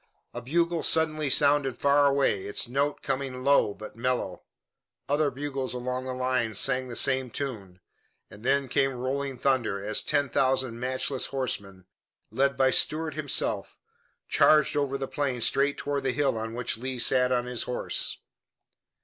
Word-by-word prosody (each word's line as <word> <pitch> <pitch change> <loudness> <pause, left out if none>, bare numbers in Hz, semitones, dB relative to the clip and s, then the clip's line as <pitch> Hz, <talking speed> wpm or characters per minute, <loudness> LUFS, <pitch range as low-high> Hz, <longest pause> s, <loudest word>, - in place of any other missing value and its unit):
A 120 - -6
bugle 170 +6 0
suddenly 155 -2 +1
sounded 140 -1 +3
far 140 0 +4
away, 135 -8 +1
its 105 - 0
note 140 +4 -1
coming 135 -2 -3
low, 140 -6 +4
but 110 - -10
mellow. 125 +2 -2 0.7
Other 145 +1 +1
bugles 135 -1 -4
along 125 +1 -3
the 130 - -4
line 125 -3 -1
sang 130 +4 +1
the 120 - -7
same 130 0 +2
tune, 105 -9 -5 0.5
and 105 +1 -14
then 135 +1 +1
came 135 +2 +1
rolling 130 +2 -3
thunder, 120 -6 0
as 110 0 +1
ten 145 0 +1
thousand 130 -2 0
matchless 130 +1 -1
horsemen, 100 -8 -4 0.5
led 140 0 +1
by 135 -1 +3
Stuart 155 +3 +2
himself, - - -2 0.5
charged 155 -1 +4
over 140 -2 0
the 135 0 -4
plain 135 -4 -2
straight 140 +4 +2
toward 145 -1 -2
the 130 -2 -1
hill 140 -3 +1
on 110 +1 -5
which 120 -2 -1
Lee 130 +1 -4
sat 125 +1 +3
on 125 -1 +1
his 125 -2 -1
horse. 125 - 0
130 Hz, 160 wpm, -27 LUFS, 125-140 Hz, 0.7 s, far